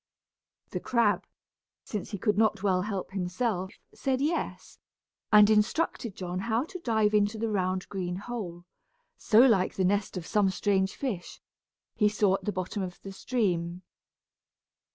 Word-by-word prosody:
The - - -2
crab, 230 -4 +1 0.6
since 210 -3 -5
he 205 - -4
could 210 +2 +1
not 215 -2 +2
well 185 -2 +2
help 195 -1 -4
himself, 190 +1 -2 0.2
said 265 -1 -1
yes, 310 +5 -2 0.5
and 210 -1 +8
instructed 215 - +1
John 180 0 -4
how 225 +4 0
to 365 +4 -8
dive 220 -7 +1
into 210 +1 +2
the 225 +1 -1
round 185 -2 -1
green 180 -3 -3
hole, 190 -5 -6 0.5
so 225 0 +4
like 220 -8 +4
the 190 - +1
nest 200 0 0
of 175 - -5
some 205 -1 +2
strange 190 0 0
fish, 210 -11 -4 0.5
he 210 -2 +3
saw 205 -2 +2
at 195 - -2
the 210 - 0
bottom 185 +1 -3
of 180 -2 -5
the 195 - -7
stream. 185 -5 -1
205 Hz, 155 wpm, -28 LUFS, 185-220 Hz, 0.6 s, and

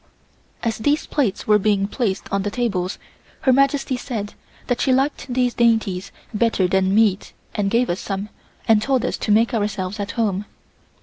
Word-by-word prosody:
As 230 -2 -1
these 290 +7 +1
plates 230 -10 -1
were 210 0 +4
being 200 -1 +1
placed 205 -4 -2
on 200 - +2
the 205 - -2
tables 200 -5 -2 0.4
Her 260 - +4
Majesty 275 0 +2
said 215 -5 -5 0.3
that 245 - -1
she 265 - +2
liked 270 +1 0
these 245 -1 +1
dainties 220 -6 +1 0.2
better 210 -4 +2
than 190 +1 +2
meat 210 -3 +2 0.2
and 205 -2 0
gave 235 +3 +2
us 175 - -2
some 200 +1 -4 0.4
and 220 -2 +5
told 260 +1 +1
us - - -1
to 215 - -2
make 225 +4 +3
ourselves 205 -2 -2
at 205 0 -3
home. 210 -4 -1
215 Hz, 175 wpm, -21 LUFS, 200-245 Hz, 0.4 s, and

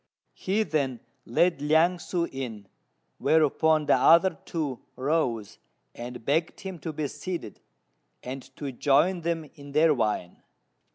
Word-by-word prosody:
He 205 +4 0
then 135 - -1 0.3
led 170 +6 +2
Liang 160 +4 +3
ssŭ 170 0 -2
in; 115 -7 -6 0.5
whereupon 155 0 +3
the - - +4
other 170 +3 +5
two 150 -7 -3 0.2
rose, 130 -7 -1 0.3
and 120 -1 -8
begged 160 +4 0
him 190 -3 -6
to 160 - -4
be 150 -1 -2
seated, 145 - -6 0.6
and 130 +2 -5
to 140 -2 -5
join 150 +8 +2
them 165 -1 -1
in 140 -1 -12
their 155 +1 +5
wine. 105 -8 -2
150 Hz, 130 wpm, -27 LUFS, 130-165 Hz, 0.6 s, other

